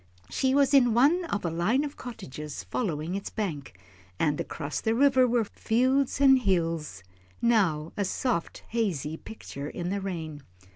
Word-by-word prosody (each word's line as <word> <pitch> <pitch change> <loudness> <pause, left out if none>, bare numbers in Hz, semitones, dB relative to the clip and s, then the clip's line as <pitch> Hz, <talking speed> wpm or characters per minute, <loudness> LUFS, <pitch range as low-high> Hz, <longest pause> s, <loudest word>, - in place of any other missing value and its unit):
She 265 0 +1
was 280 0 +3
in 245 -5 +5
one 310 +9 +4
of 205 - -3
a 170 - 0
line 205 - +1
of 290 -1 -5
cottages 150 - -7
following 165 -7 -2
its 195 0 -4
bank, 150 - -4 0.4
and 150 - +1
across 145 +1 -4
the 225 0 +1
river 260 -1 +5
were 240 -1 +2
fields 255 +6 +1
and 270 -1 +6
hills, 165 - -1 0.4
now 180 -10 +2
a 205 - 0
soft, 200 -1 -2
hazy 180 - -1
picture 145 -7 -8
in 175 -1 -4
the 200 0 -2
rain. 160 -6 -5
200 Hz, 155 wpm, -27 LUFS, 160-250 Hz, 0.4 s, and